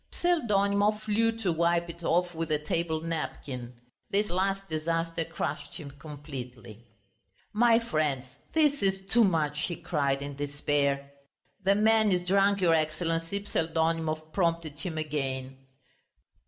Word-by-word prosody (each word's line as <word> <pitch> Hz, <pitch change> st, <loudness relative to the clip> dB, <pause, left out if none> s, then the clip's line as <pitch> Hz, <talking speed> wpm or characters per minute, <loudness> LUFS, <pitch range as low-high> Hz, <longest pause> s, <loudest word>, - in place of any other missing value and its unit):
Pseldonimov 210 Hz, -, +2 dB
flew 220 Hz, +2 st, +2 dB
to 225 Hz, -5 st, -1 dB
wipe 170 Hz, +1 st, +2 dB
it 170 Hz, 0 st, -9 dB
off 175 Hz, +2 st, +2 dB
with 165 Hz, -1 st, -3 dB
a 150 Hz, -, +4 dB
table 160 Hz, +1 st, -1 dB
napkin. 135 Hz, -6 st, -4 dB, 0.3 s
This 205 Hz, 0 st, +1 dB
last 195 Hz, +2 st, 0 dB
disaster 165 Hz, +1 st, -1 dB
crushed 160 Hz, -2 st, -4 dB
him 145 Hz, -3 st, -7 dB
completely. 130 Hz, -6 st, -9 dB, 0.7 s
"My 230 Hz, +1 st, +5 dB
friends, 155 Hz, -, 0 dB, 0.3 s
this 295 Hz, -4 st, +3 dB
is 190 Hz, -1 st, 0 dB
too 240 Hz, 0 st, +6 dB
much," 155 Hz, -6 st, +1 dB
he 175 Hz, -, -3 dB
cried 140 Hz, -4 st, -1 dB
in 140 Hz, 0 st, -6 dB
despair. 140 Hz, -1 st, 0 dB, 0.5 s
"The 195 Hz, +1 st, +4 dB
man 220 Hz, 0 st, +4 dB
is 180 Hz, -1 st, +1 dB
drunk, 200 Hz, +1 st, +3 dB
your 170 Hz, -2 st, +5 dB
Excellency," 165 Hz, +4 st, -1 dB
Pseldonimov 160 Hz, -2 st, -1 dB
prompted 165 Hz, -5 st, 0 dB
him 165 Hz, -2 st, -4 dB
again. 135 Hz, -3 st, -3 dB
165 Hz, 130 wpm, -29 LUFS, 150-195 Hz, 0.7 s, too